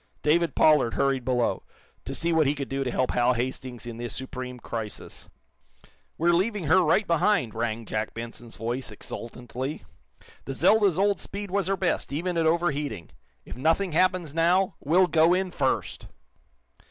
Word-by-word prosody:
David 160 0 +2
Pollard 150 -7 +4
hurried 135 -2 +1
below, 125 -1 0 0.4
to - - -5
see 170 0 0
what 160 -3 +3
he 145 - +1
could 140 -2 -5
do 135 0 -1
to 130 - -2
help 130 +1 0
Hal 125 +1 +3
Hastings 125 0 -4
in 120 -1 -7
this 120 0 -5
supreme 130 -1 -5
crisis. 110 -3 -7 0.9
"We're 170 +2 +3
leaving 200 +3 0
her 165 +5 +4
right 185 +5 +3
behind," 165 - +2
rang 115 0 -3
Jack 110 0 -3
Benson's 115 0 -8
voice, 120 +3 -3
exultantly. 125 +5 -7 0.6
"The 135 - -5
'Zelda's' 205 0 +4
old 200 +1 +2
speed 200 -1 -7
was 195 -2 0
her 195 0 0
best, 185 -6 -1
even 170 +5 -2
at 165 -1 +2
overheating. 150 - -1 0.3
If - - -8
nothing 165 +8 +1
happens, 175 -2 +1
now, 180 +4 +2
we'll 175 +6 +4
go 165 +1 +4
in 185 0 -1
first!" 135 -5 -2
150 Hz, 165 wpm, -26 LUFS, 125-175 Hz, 0.9 s, Pollard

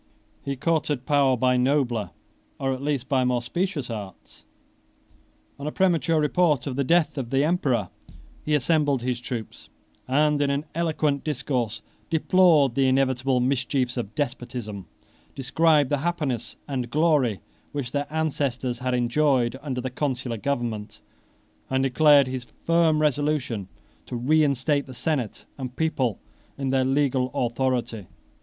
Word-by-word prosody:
He 140 - -3
courted 150 -2 -1
power 140 -3 +3
by 125 +1 +2
nobler, 125 -6 +1 0.5
or, 135 0 0
at 130 - -6
least, 140 -3 -1
by 130 -3 +2
more 125 -1 +1
specious 170 -2 -2
arts. 100 -4 -9 1.1
On 140 - -5
a - - -2
premature 165 -3 +2
report 150 -3 +2
of 135 - -3
the 140 - +1
death 165 0 +2
of 120 -3 -4
the 135 +2 +2
emperor, 135 - +1 0.5
he 150 - +1
assembled 145 -3 +1
his 125 -1 -1
troops; 120 -3 -7 0.4
and, 145 +2 +2
in 145 - +2
an 140 +2 -1
eloquent 155 -4 0
discourse, 125 -7 -2 0.3
deplored 160 -5 +4
the 135 +1 +2
inevitable 130 -1 +2
mischiefs 130 0 0
of 115 -4 -5
despotism, 120 -7 -4 0.5
described 145 +1 +2
the 145 - +3
happiness 145 -7 -2
and 130 -4 -3
glory 145 - +2 0.3
which 140 -4 -4
their 145 0 -2
ancestors 140 -6 -1
had 125 0 -1
enjoyed 125 0 +2
under 130 -4 -3
the 130 0 -4
consular 125 -3 -2
government, 115 -5 -3 0.7
and 130 0 +1
declared 145 +1 +5
his 130 -1 -5 0.2
firm 165 -2 +3
resolution 145 -8 0 0.4
to - - -5
reinstate 140 +1 +2
the 130 - -10
senate 135 -5 -2
and 130 -2 -5
people 130 -9 0 0.4
in 135 -1 -2
their 130 -1 +2
legal 135 -1 +1
authority. 120 -5 -1
135 Hz, 140 wpm, -25 LUFS, 125-150 Hz, 1.1 s, declared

